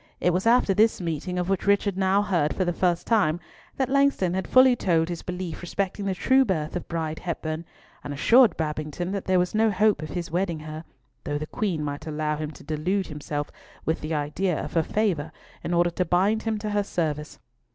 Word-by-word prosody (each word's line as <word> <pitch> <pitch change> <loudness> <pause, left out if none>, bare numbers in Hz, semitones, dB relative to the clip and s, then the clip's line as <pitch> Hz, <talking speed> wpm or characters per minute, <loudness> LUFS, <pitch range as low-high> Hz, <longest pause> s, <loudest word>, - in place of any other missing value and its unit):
It 180 - +2
was 185 +5 0
after 235 -4 +4
this 220 +3 +3
meeting, 170 +1 -3
of 180 -1 -1
which 195 0 -1
Richard 200 -1 +3
now 195 +1 +2
heard 175 -7 0
for 185 - 0
the 175 - 0
first 175 0 0
time, 185 -8 +2 0.4
that 265 - +1
Langston 275 -9 +2
had 190 0 -2
fully 255 -1 +6
told 165 -6 +1
his 170 -2 -4
belief 180 -3 -5
respecting 195 +3 -3
the 195 -1 -1
true 265 +7 +4
birth 165 -9 -2
of 180 - -4
Bride 160 -2 -3
Hepburn, 160 -1 -4 0.4
and - - -6
assured 230 - +5
Babington 155 +3 -3
that 200 -1 -3
there 185 0 +3
was 180 0 +1
no 220 +1 +3
hope 205 -3 +2
of 155 - -6
his 175 -3 -4
wedding 175 -2 -1
her, 155 +1 -7 0.4
though 145 - -2
the 155 - -4
Queen 170 -3 -2
might 145 +1 -5
allow 150 0 -1
him 155 0 -4
to 150 - -13
delude 160 +6 -1
himself 145 -1 -4 0.3
with 160 - 0
the 155 +1 -2
idea 155 +4 -1
of - - -7
her 165 - +3
favour 165 -5 -1 0.3
in - - -3
order 175 0 +3
to 180 - 0
bind 190 +6 +2
him 225 -1 -1
to 210 0 -4
her 205 0 +2
service. 155 -6 -3
175 Hz, 215 wpm, -25 LUFS, 155-200 Hz, 0.4 s, fully